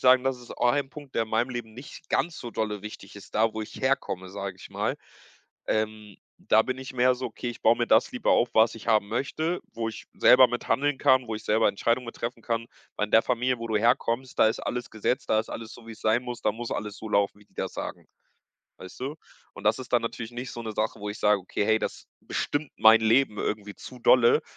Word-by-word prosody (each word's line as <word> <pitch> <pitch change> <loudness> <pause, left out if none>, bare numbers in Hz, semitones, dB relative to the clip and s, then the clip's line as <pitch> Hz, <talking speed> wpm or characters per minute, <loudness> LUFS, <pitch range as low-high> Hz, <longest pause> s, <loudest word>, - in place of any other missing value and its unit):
sagen, 130 0 +6
das 135 -1 0
ist 120 - -14
auch 120 0 +3
ein 140 -2 -1
Punkt, 145 -3 -12
der 115 - +2
in 110 - -6
meinem 115 +3 +1
Leben 120 -3 -5
nicht 125 +5 -11
ganz 170 -1 0
so 120 - -7
dolle 105 -3 -3
wichtig 100 -2 -9
ist: 100 - -13
„Da, 110 +1 +2
wo 110 - -3
ich - - -9
herkomme“, 130 -9 -1
sage 100 -1 -6
ich - - -10
mal. - - -2 0.7
Ähm, 110 -2 -2 0.2
da 110 - +4
bin 130 +2 -3
ich 130 0 -7
mehr 125 0 +4
so: 130 +1 -4
„Okay, 120 +1 -6
ich 120 - -11
baue 115 +2 +5
mir 120 - +1
das 115 - +4
lieber 250 -3 +1
auf, 120 - +3
was 110 +1 +5
ich 115 - -11
haben 110 -2 +3
möchte, 155 +9 -2
wo 115 -1 -3
ich 110 - -8
selber 125 0 +7
mit 120 0 -4
handeln 145 0 +1
kann, 130 -1 +4
wo 110 - -2
ich 110 - -7
selber 110 +1 +3
Entscheidungen 115 +5 0
mit 115 - -8
treffen 120 +2 -5
kann.“ 115 -1 -2 0.3
Weil 105 - 0
in - - -17
der 110 - +7
Familie, 125 0 0
wo 115 0 -5
du 110 - +1
herkommst, 120 +2 +1
da 110 - +6
ist 110 - -2
alles 125 0 -4
gesetzt. 110 +4 -2
Da 110 - +4
ist 110 - -9
alles 110 -1 -7
so, 115 - -13
wie's 110 -2 -10
sein 110 +3 +2
muss. 120 -1 -6
Da 105 - +2
muss 120 +1 -6
alles 105 -1 -4
so 110 - -7
laufen, 100 -1 +1
wie 105 - -20
die - - -34
das - - -3
sagen. - - -6 0.7
Weißt 95 +4 -11
du? 140 +4 -4 0.4
Und 100 - -11
das 105 +3 +3
ist 125 -1 -9
dann 120 - +4
natürlich 115 0 -5
nicht 120 +1 -6
so 120 - -6
'ne 110 - -4
Sache, 110 0 -2
wo 105 - -4
ich 105 - -7
sage: 105 -1 +3
„Okay, 95 +2 -2
hey, 110 0 +4
das - - -5
bestimmt 145 0 -2
mein 110 0 +7
Leben 110 0 +3
irgendwie 105 -1 -3
zu 125 - -11
dolle. 120 -1 +5
115 Hz, 250 wpm, -27 LUFS, 110-125 Hz, 0.7 s, selber